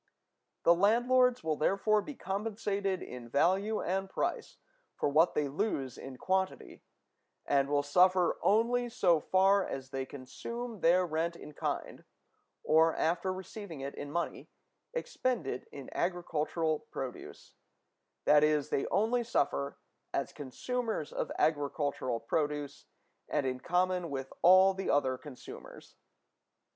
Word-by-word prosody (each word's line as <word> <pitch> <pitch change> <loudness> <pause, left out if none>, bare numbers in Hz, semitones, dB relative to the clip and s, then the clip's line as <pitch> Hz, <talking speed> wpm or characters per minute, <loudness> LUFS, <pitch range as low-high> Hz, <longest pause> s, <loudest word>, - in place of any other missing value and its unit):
The 170 - +7
landlords 240 +6 +3
will 155 -2 0
therefore 205 +6 +2
be 280 +8 -8
compensated 200 -2 -2
in 125 -2 -9
value 190 - +2
and 190 +2 -1
price - - -3 0.4
for - - 0
what 155 +4 +3
they 150 -1 +1
lose 140 - -2
in 135 -1 -9
quantity, 190 +3 -2 0.6
and 140 -1 +2
will 145 0 +2
suffer 180 +4 +3
only 240 +3 +2
so 185 -9 +3
far 190 +4 +3
as 135 -4 -6
they 135 0 -3
consume 230 - -7
their 180 +2 +4
rent 165 +1 -1
in 150 - -11
kind, - - -4 0.6
or, 160 +1 +4
after 170 +3 0
receiving 185 -4 -7
it 140 +1 -5
in 145 - -7
money, 170 +2 -3 0.4
expend 255 - -2
it 130 -1 -4
in 140 -2 -9
agricultural 165 -3 -1
produce; 130 -2 -7 0.7
that 150 0 +6
is, 150 -2 +2
they 135 - 0
only 225 +5 +1
suffer 70 - -1 0.4
as - - -2
consumers 220 - -3
of - - -3
agricultural 145 -5 0
produce, 145 +3 -2 0.4
and 150 -2 0
in 130 -1 -2
common 180 +2 0
with 135 -1 -5
all 185 +2 +7
the 195 0 -4
other 130 -2 +2
consumers. 135 -2 -11
170 Hz, 130 wpm, -31 LUFS, 145-195 Hz, 0.7 s, The